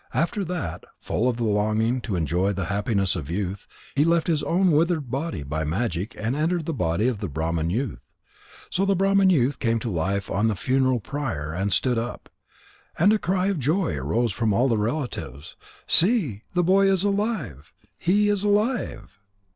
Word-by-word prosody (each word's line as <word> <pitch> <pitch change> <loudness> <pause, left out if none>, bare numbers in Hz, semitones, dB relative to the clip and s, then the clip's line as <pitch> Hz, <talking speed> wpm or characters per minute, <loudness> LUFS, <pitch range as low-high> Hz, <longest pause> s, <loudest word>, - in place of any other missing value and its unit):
After 185 +5 0
that, 175 - -4
full 125 +3 -1
of 120 - -2
the 120 - -2
longing 110 +3 +1
to 105 -6 -3
enjoy 90 +4 0
the 95 -2 -3
happiness 100 -2 0
of 80 -5 -5
youth, 95 +2 -3 0.3
he 140 - +4
left 165 0 +2
his 160 -4 +1
own 185 +1 +2
withered 155 -4 +1
body 140 - -3
by 75 +3 -3
magic 90 +4 -2
and 115 +4 -2
entered 160 +2 0
the 165 - -2
body 90 - 0
of 120 -5 -1
the 100 - -3
Brahman 80 +1 -2
youth. 115 +5 -2 0.7
So 190 - 0
the 195 0 +2
Brahman 195 +1 +4
youth 140 -5 +2
came 115 -2 +1
to 115 0 -3
life 95 +4 -2
on 105 +3 +1
the 110 - 0
funeral 130 +2 +1
pyre 100 - -4
and 100 +4 -1
stood 125 +1 +2
up. 120 +2 -6 0.7
And 200 +6 +5
a 215 - +2
cry 185 0 0
of 195 -5 -1
joy 155 - 0
arose 105 - 0
from 110 +2 0
all 125 +6 +3
the 115 -4 +1
relatives: 105 - -4 0.3
"See! 165 - +2
The 175 - +3
boy 195 +2 +4
is 190 -1 +2
alive! 195 - -2 0.3
He 205 +4 +2
is 205 -1 +1
alive!" 210 - -1
120 Hz, 185 wpm, -24 LUFS, -, 0.7 s, And